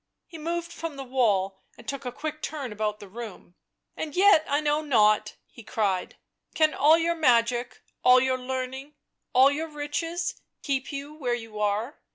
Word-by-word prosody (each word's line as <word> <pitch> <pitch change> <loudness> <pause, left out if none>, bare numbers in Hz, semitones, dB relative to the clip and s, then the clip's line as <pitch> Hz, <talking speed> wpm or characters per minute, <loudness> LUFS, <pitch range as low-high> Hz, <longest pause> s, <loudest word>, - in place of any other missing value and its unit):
He 330 - -11
moved 340 +2 -3
from 330 -3 -5
the 275 - -6
wall 205 -7 +1 0.2
and - - -15
took 275 -1 -5
a 250 - -3
quick 305 +4 -5
turn 280 -6 -4
about 210 0 -2
the 205 - -10
room. 215 -3 -9 0.2
" - - -53
And 300 -2 -5
yet 375 -4 +6
I 285 - +2
know 300 0 +1
not 215 -7 +3
!" - - -52
he - - -10
cried. 205 -5 -1 0.2
" - - -39
Can 310 -1 +3
all 310 +3 +5
your 335 +1 +1
magic, 240 -5 +1 0.2
all 255 0 +7
your 260 0 +1
learning, 260 +3 -5 0.4
all 265 +2 +6
your 315 +3 -2
riches, 325 +3 -3 0.2
keep 270 0 -1
you 285 +1 -6
where 255 -6 -1
you 225 -3 -8
are? 210 +6 -1
265 Hz, 190 wpm, -26 LUFS, 230-305 Hz, 0.4 s, all